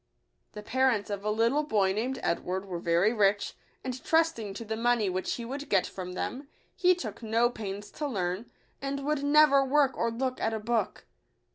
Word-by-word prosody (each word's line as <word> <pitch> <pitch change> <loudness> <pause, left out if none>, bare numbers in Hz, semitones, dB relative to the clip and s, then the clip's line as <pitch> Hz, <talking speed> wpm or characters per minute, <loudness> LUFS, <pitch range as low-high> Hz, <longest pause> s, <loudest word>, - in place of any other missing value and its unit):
HE 210 - -7
parents 240 -3 +1
of 200 -1 -4
a 210 - -1
little 230 +7 +2
boy 205 -10 +1
named 250 +6 -2
Edward 185 +3 -1
were 180 -3 -5
very 170 +6 +2
rich; 205 -2 +2 0.3
and 255 0 -5
trust 325 -4 +2
ing 210 -3 -5
to 230 - -6
the 220 +1 -3
money 230 -3 +2
which 185 +1 -2
he 235 - -6
would 280 +4 -6
get 195 -3 +3
from 180 -1 -6
them, 265 +9 -4 0.3
he 365 -1 +4
took 235 - -6
no 230 +2 +2
pains 205 -2 -6
to 300 - -3
learn, 190 -2 -2 0.3
and 275 0 -3
would 300 -1 0
never 285 -1 +6
work 275 0 +2
or 230 - 0
look 255 +2 -3
at 225 0 0
a - - -3
book. 225 +1 -1
230 Hz, 195 wpm, -29 LUFS, 205-270 Hz, 0.3 s, never